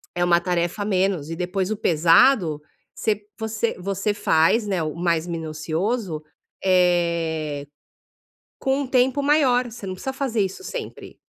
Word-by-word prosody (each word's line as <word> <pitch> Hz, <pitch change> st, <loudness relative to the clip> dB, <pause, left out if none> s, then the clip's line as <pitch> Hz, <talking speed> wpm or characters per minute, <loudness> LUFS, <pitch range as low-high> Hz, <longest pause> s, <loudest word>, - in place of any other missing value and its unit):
É 175 Hz, -, +1 dB
uma 170 Hz, -1 st, +4 dB
tarefa 175 Hz, +2 st, -1 dB
a -, -, -1 dB
menos 185 Hz, -6 st, 0 dB
e 165 Hz, -, -4 dB
depois 185 Hz, +2 st, -2 dB
o 215 Hz, -, -1 dB
pesado 170 Hz, -, +4 dB, 0.3 s
você 215 Hz, -2 st, -1 dB, 0.2 s
você 220 Hz, +1 st, -2 dB
você 195 Hz, +3 st, -1 dB
faz, 205 Hz, +3 st, +2 dB
né, 190 Hz, -4 st, -1 dB
o 155 Hz, -1 st, -3 dB
mais 170 Hz, -1 st, 0 dB
minucioso, 165 Hz, +3 st, -3 dB, 0.4 s
eh, 170 Hz, -5 st, +1 dB, 0.9 s
com 270 Hz, +1 st, 0 dB
um 280 Hz, -, -3 dB
tempo 260 Hz, +2 st, +2 dB
maior. 280 Hz, -4 st, +3 dB
Você 225 Hz, -2 st, -9 dB
não 185 Hz, -, -4 dB
precisa 265 Hz, +8 st, -5 dB
fazer 260 Hz, -5 st, -1 dB
isso 195 Hz, -, -3 dB
sempre. -, -, -7 dB
185 Hz, 150 wpm, -23 LUFS, 170-225 Hz, 0.9 s, uma